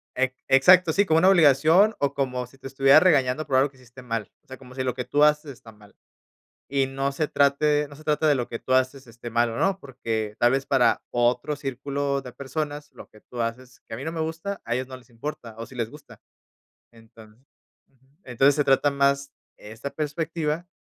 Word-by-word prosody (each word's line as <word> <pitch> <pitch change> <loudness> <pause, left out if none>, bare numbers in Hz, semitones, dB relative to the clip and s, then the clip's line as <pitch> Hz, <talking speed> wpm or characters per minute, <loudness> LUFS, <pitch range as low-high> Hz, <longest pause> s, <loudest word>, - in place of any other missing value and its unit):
E 130 0 0
exacto, 170 +5 +5
sí, 200 +4 +3
como 160 -3 +3
una 185 +3 +5
obligación, 170 +4 +5
o 140 -1 0
como 125 -3 -2
si 135 - -21
te 135 - -9
estuviera 135 +2 +5
regañando 150 -4 +2
por 140 -2 -2
algo 135 +2 +3
que 135 - -25
hiciste 125 0 -15
mal. 115 -4 -4
O - - -41
sea, 130 - -10
como 125 -1 -15
si 130 - -2
lo 125 -1 -1
que 125 0 -5
tú 145 +4 +2
haces 150 -1 +2
está 115 -3 -14
mal. 105 -1 -20 0.8
Y 135 -1 +1
no 135 +1 -3
se 150 +2 -2
trate 145 +1 +2
no 145 - -13
se 155 - -15
trata 155 +1 +1
de 145 - +4
lo 125 -3 -2
que 115 - -5
tú 130 - -4
haces 130 +1 0
esté 120 0 -10
mal 120 +1 +1
o 115 - -6
no, 195 0 +1
porque 110 - -5
tal 120 +1 +3
vez 135 0 -1
para 135 -3 +2
otro 120 +4 0
círculo 140 0 -3
de 125 -2 -11
personas, 145 +3 -5
lo - - -13
que 110 - -20
tú 125 - -9
haces, 125 +2 -5
que - - -7
a - - -5
mí 130 - -7
no 160 - -4
me 165 - -4
gusta, 165 +5 -4
a 120 - -2
ellos 130 +1 -2
no 130 0 -9
les 130 0 -19
importa, 115 -1 -7
o 115 - -6
sí - - -15
les 115 -2 -3
gusta. 140 -7 -15 0.7
Entonc 110 -1 -18 0.5
ujú, 130 -1 -34 0.2
entonces, 135 +3 +2
se 145 - +1
trata 140 +1 +3
más 140 0 +1 0.3
esta 110 +6 -8
perspectiva 155 +2 -3
135 Hz, 225 wpm, -24 LUFS, 125-150 Hz, 0.8 s, exacto